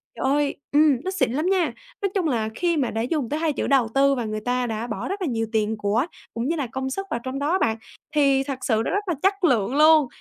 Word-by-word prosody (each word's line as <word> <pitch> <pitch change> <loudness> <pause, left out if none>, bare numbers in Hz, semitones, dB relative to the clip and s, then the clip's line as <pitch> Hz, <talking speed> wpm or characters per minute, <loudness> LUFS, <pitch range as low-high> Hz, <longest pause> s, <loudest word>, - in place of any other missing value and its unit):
Trời - - -3
ơi 285 +1 +1 0.2
ừm, 295 -2 +5
nó 375 - -2
xịn 385 - 0
lắm 300 +6 -1
nha, 360 -9 +1 0.3
nói 395 - +1
chung 360 -5 +1
là 225 -5 0
khi 345 -2 0
mà 265 -4 0
đã 225 - -2
dùng 260 -1 -1
tới 300 - -2
hai 320 -3 0
chữ - - -2
đầu 265 -5 +3
tư 275 0 +4
và 240 -3 -3
người 215 0 -4
ta 250 +1 0
đã 225 +1 -3
bỏ - - -4
rất 390 +1 -4
là 350 - 0
nhiều 225 -3 -1
tiền 220 0 0
của 210 +6 +1 0.3
cũng 235 +3 -2
như 335 - 0
là 280 -5 -2
công 265 +3 -4
sức 390 +8 -4
vào 235 - -1
trong 260 +1 -4
đó 315 +6 +1
bạn, 220 0 +1 0.4
thì 275 -2 +4
thật 270 -2 -5
sự 220 -2 +1
nó - - -1
rất 410 +1 0
là 350 - +1
chất 390 0 +1
lượng 250 - +2
luôn. 305 -2 +6
275 Hz, 275 wpm, -24 LUFS, 235-315 Hz, 0.4 s, luôn